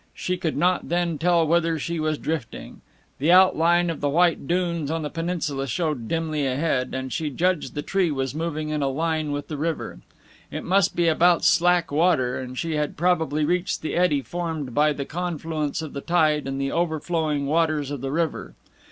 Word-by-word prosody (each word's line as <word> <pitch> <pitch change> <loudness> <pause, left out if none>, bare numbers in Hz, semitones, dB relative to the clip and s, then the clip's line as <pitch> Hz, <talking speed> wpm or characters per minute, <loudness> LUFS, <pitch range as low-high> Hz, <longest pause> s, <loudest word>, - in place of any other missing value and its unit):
She 180 - -2
could 175 -4 -3
not 180 +1 +1
then 170 -2 0
tell 170 -1 +3
whither 165 0 +2
she 165 +2 -3
was 155 -1 0
drifting. 155 -7 -5 0.4
The 150 +5 +3
outline 175 -2 +5
of 160 - -7
the 145 - +1
white 170 -1 +2
dunes 170 -4 -1
on 160 0 -2
the 150 - -4
peninsula 165 -5 -2
showed 140 -2 -2
dimly 160 -1 -1
ahead, 130 -1 -1
and 130 -1 -4
she 160 -2 -2
judged 175 +5 -1
the 145 - -3
tree 190 0 +1
was 135 -2 -2
moving 155 -1 -3
in 150 -1 -1
a 140 - +1
line 155 +2 -1
with 145 0 -4
the 150 - -5
river. 160 - -3 0.5
It - - -5
must 190 0 +2
be 170 -1 +2
about 170 +1 +4
slack 175 -1 +3
water, 145 -5 +2
and 130 0 -7
she 165 0 -2
had 150 -1 -2
probably 160 -3 +1
reached 180 +3 -1
the 155 - -3
eddy 165 -6 +2
formed 160 -7 -4
by 150 +2 +3
the 140 -1 -4
confluence 160 -2 -3
of 155 - -7
the 140 - -5
tide 155 -4 +2
and 135 0 -3
the 135 0 -1
overflowing 160 -3 -1
waters 155 -1 +1
of 140 -3 -4
the 135 0 -3
river. 165 +1 -2
160 Hz, 195 wpm, -24 LUFS, 145-170 Hz, 0.5 s, outline